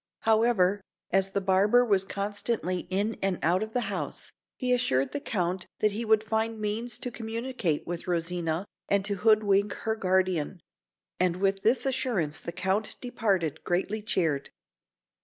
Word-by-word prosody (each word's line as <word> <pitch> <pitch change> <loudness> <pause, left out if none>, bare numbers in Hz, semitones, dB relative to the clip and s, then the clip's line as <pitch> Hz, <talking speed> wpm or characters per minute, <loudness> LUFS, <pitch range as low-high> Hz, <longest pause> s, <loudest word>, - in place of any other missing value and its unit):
However, 220 -4 +3 0.3
as 195 0 +3
the 200 +1 -1
barber 200 +6 +4
was 200 -4 +3
constantly 200 -1 -2
in 205 +4 0
and 195 -2 +1
out 175 +4 +3
of 220 0 -3
the 250 - +1
house, 185 - -4 0.3
he 250 -1 +1
assured 135 - +1
the 290 - -2
Count 180 -7 -2
that 215 - +2
he 225 +3 -3
would 220 -1 +4
find 220 0 -1
means 215 +2 -1
to 250 0 -4
communicate 230 - -2
with 175 +1 -5
Rosina, 170 0 -1 0.2
and 200 -1 +2
to 200 -1 0
hood 215 +2 +4
wink 200 0 +2
her 220 0 +1
guardian; 185 -4 0 0.6
and 180 -1 +2
with 195 +1 0
this 235 +7 +3
assurance 240 - 0
the - - -6
Count 190 +4 -1
departed, 200 - -1
greatly 195 +5 -1
cheered. 165 -9 0
200 Hz, 160 wpm, -28 LUFS, 180-220 Hz, 0.6 s, barber